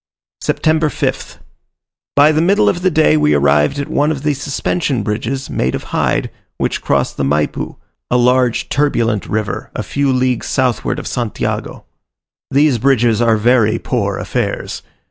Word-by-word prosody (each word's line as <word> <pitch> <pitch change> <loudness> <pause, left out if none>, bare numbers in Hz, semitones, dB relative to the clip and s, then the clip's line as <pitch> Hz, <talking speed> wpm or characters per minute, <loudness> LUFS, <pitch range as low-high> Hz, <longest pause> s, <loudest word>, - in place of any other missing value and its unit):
September 155 -1 +1
5th. - - -3 0.8
By 145 +2 +6
the 155 0 +1
middle 195 +5 +3
of 175 - +1
the 185 - +3
day 75 - +3
we 75 0 +3
arrived 75 - +2
at 140 - -3
one 145 +1 +1
of 150 -3 -3
the 150 -1 +1
suspension 140 -2 -2
bridges, 115 +6 -3
made 65 +1 -1
of - - -5
hide, - - 0 0.3
which - - -2
cross - - 0
the - - -3
Maypu, 75 +2 -1 0.3
a 125 - +2
large 125 -1 +2
turbulent 120 -7 0
river 105 -2 -3
a - - -3
few 140 -1 0
leagues 130 -1 0
southward 130 -4 0
of - - -6
Santiago. 120 -3 -3 0.6
These 140 -3 +3
bridges 120 -3 +2
are 115 -2 +3
very 115 0 +3
poor 100 -7 -2
affairs. - - -3
125 Hz, 155 wpm, -16 LUFS, 105-140 Hz, 0.8 s, By